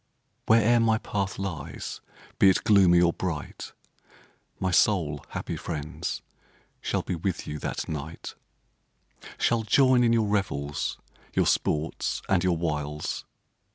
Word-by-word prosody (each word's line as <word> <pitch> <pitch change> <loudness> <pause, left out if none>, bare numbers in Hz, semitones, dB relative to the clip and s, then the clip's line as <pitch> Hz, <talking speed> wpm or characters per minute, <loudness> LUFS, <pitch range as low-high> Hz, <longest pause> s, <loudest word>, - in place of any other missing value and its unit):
Where'er 115 +1 +5
my 110 -1 +3
path 100 -3 -3
lies, 90 -7 -5 0.4
be 95 - +7
it 95 - +2
gloomy 95 -4 +6
or 85 -1 +4
bright, 85 -6 -5 0.9
My 95 -1 0
soul, 80 -7 +2
happy - - -4
friends, 75 -2 -4 0.6
shall - - -1
be - - -3
with 90 +2 -2
you 75 - -5
that - - -3
night; 80 +1 -6 1.0
Shall 115 -1 +2
join 125 +3 +4
in 115 - +4
your 115 -2 +3
revels, 90 -9 -1 0.4
your - - +3
sports 75 +2 0
and 95 -2 +2
your 90 -2 +2
wiles. 75 -2 -3
90 Hz, 125 wpm, -27 LUFS, 75-105 Hz, 1.0 s, be